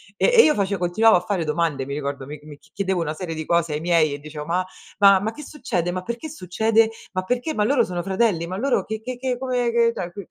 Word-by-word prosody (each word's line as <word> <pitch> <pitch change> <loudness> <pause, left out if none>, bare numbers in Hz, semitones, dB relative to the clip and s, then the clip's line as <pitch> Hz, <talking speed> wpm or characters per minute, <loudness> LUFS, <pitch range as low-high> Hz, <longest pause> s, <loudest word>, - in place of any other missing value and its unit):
e - - +2
e 460 - +9
io 305 - +4
face 200 -1 0
continuavo 180 +4 +4
a - - +1
fare 180 -3 -2
domande, 150 -3 -1
mi 140 - -5
ricordo, 140 -2 -4
mi 150 +2 -8
mi 150 -1 -11
chiedevo 190 -3 -3
una 155 -1 -2
serie 165 -1 -5
di 160 0 -5
cose 170 -2 +1
ai 150 - -3
miei 165 -4 +2
e 145 - -6
dicevo: 150 0 -8
"Ma 180 +3 0 0.3
ma 195 -2 +7
ma 215 +3 -2
che 300 - -10
succede? 185 - -3
Ma 185 0 -3
perché 235 +10 -5
succede? 220 +3 +1 0.2
Ma 185 0 -1
perché? 250 +9 -2
Ma 210 - +1
loro 255 0 +3
sono 180 -4 -3
fratelli? 190 -3 0
Ma 185 +2 -5
loro 265 +4 +1
che 220 0 -4
che 250 +1 -6
che 250 -1 -2
come 250 -2 -1
che" 235 0 +3
cioè 180 0 -6
185 Hz, 250 wpm, -22 LUFS, 165-230 Hz, 0.3 s, e